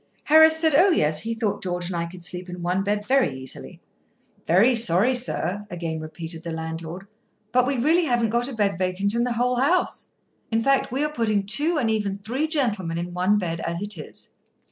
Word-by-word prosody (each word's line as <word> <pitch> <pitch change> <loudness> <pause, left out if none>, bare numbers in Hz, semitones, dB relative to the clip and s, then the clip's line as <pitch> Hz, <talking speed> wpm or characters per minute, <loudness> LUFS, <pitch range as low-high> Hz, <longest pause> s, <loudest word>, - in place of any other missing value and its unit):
Harris 315 +1 +6
said, 320 -2 +2
"Oh, 350 +8 +6
yes;" 155 - +2
he 225 +4 -3
thought 225 -3 -2
George 180 -1 -3
and 180 0 -4
I 170 0 -2
could 175 0 -12
sleep 180 +1 -6
in 180 -1 -7
one 180 +2 0
bed 205 +1 -1
very 260 - +2
easily. 130 0 -5 0.7
"Very 200 +10 +5
sorry, 230 +1 +3
sir," 210 -5 -1
again 165 -2 -4
repeated 160 +1 -8
the 170 - -5
landlord: 160 +3 -6 0.5
"but 250 +1 +3
we 275 -1 0
really 320 +8 +3
haven't 240 -5 +1
got 240 +2 0
a 265 - -7
bed 200 -4 0
vacant 185 +2 0
in 235 +1 +1
the 245 - -1
whole 245 +1 0
house. 300 +8 0 0.4
In 225 0 0
fact, 275 -1 +2
we 270 +3 -1
are 300 0 -2
putting 215 -6 0
two, 300 - +3
and 235 -6 +1
even 205 -3 -1
three 245 +10 -2
gentlemen 215 - -1
in 175 +1 -5
one 185 +4 +2
bed, 170 -4 -3
as 170 +1 -3
it 205 +1 -3
is." 155 - -10
205 Hz, 210 wpm, -24 LUFS, 175-250 Hz, 0.7 s, Harris